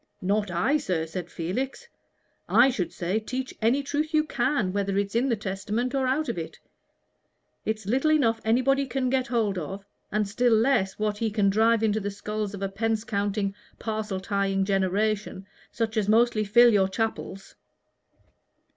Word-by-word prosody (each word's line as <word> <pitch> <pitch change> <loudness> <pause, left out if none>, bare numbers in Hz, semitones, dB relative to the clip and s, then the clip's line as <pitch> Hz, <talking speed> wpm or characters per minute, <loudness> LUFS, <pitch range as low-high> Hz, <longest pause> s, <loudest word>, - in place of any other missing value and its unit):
"Not 205 +2 +1
I, 180 - +2
sir," 180 - -1
said 175 +1 -6
Felix; 255 - -4 0.6
"I 260 +3 +6
should 185 -8 -2
say, 185 +5 -1
teach 255 +4 -5
any 245 +6 +2
truth 300 +3 -2
you 305 - +4
can, 260 -8 0
whether 200 -1 -1
it's 200 -1 -1
in 245 +4 +1
the 235 - +2
Testament 210 +4 -3
or 265 -1 +1
out 290 +4 0
of 230 - -2
it. 160 - -7 1.1
It's 220 -1 -2
little 260 +9 +1
enough 230 -7 +2
anybody 265 +5 +2
can 255 0 -1
get 260 -1 +1
hold 220 -6 0
of, 195 +5 -6 0.3
and 210 0 0
still 235 +3 +2
less 220 -5 +2
what 210 -1 -1
he 225 - 0
can 205 -2 +2
drive 225 +2 +3
into 215 -1 +2
the 205 -1 -3
skulls 210 0 -4
of 200 - -6
a - - +1
pence 220 +2 -1
counting, 200 -2 -1 0.2
parcel 215 -3 -3
tying 195 -1 0
generation, 195 +1 0 0.3
such 225 -1 -2
as 210 -1 +1
mostly 225 0 +3
fill 235 +3 +6
your 195 -2 +4
chapels." 195 -2 -4
215 Hz, 170 wpm, -26 LUFS, 195-245 Hz, 1.1 s, I